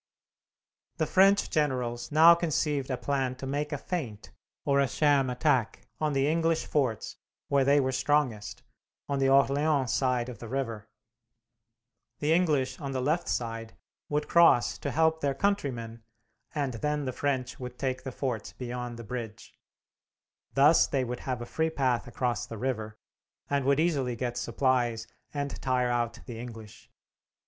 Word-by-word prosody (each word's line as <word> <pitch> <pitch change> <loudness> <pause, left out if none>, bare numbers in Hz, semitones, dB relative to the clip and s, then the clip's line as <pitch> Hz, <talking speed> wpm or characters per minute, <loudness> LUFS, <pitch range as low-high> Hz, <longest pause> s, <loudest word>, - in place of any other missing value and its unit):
The - - +1
French 195 +2 +4
generals 125 -5 -1
now 160 +3 +8
conceived 150 -5 -1
a 130 - -1
plan 135 -2 -1
to 130 - -8
make 145 +3 -2
a 145 - -1
feint, 135 - -5 0.3
or 140 0 +3
a 140 - +3
sham 140 -2 +2
attack, 125 -6 0
on 155 -1 0
the 135 0 +2
English 165 +1 +1
forts 130 -7 -1 0.3
where 140 -1 +3
they 140 +2 +4
were 130 -1 +1
strongest, 130 -6 0 0.4
on 140 -1 -1
the 135 0 +3
Orleans 140 0 +3
side 125 -2 +1
of 120 -5 -8
the 115 - -8
river. 115 -4 -4 1.3
The 150 +2 +1
English 155 -7 +1
on 140 -1 -4
the 130 - -1
left 150 +7 0
side 115 -1 -3 0.3
would 150 0 -1
cross 170 -8 +4
to - - -3
help 160 0 +2
their 140 -1 0
countrymen, 130 - -2 0.5
and 140 -4 -1
then 150 +5 -2
the 130 - -3
French 130 -2 -2
would 125 -1 -7
take 130 -1 -2
the 130 0 -6
forts 125 -4 -4
beyond 125 -1 -5
the 115 - -8
bridge. 115 -1 -7 1.0
Thus 145 +4 +6
they 135 -2 0
would 125 0 -4
have 125 -2 -2
a - - -6
free 160 +6 -1
path 130 -7 0
across 120 -1 -2
the 115 - -7
river, 110 -3 -3 0.5
and 140 -2 +1
would 140 +1 +3
easily 140 -7 +1
get 120 0 -3
supplies, 120 -2 0 0.3
and 145 -1 -4
tire 125 -1 +1
out 120 -1 -1
the 115 -3 -7
English. 115 -3 -10
130 Hz, 160 wpm, -28 LUFS, 120-145 Hz, 1.3 s, now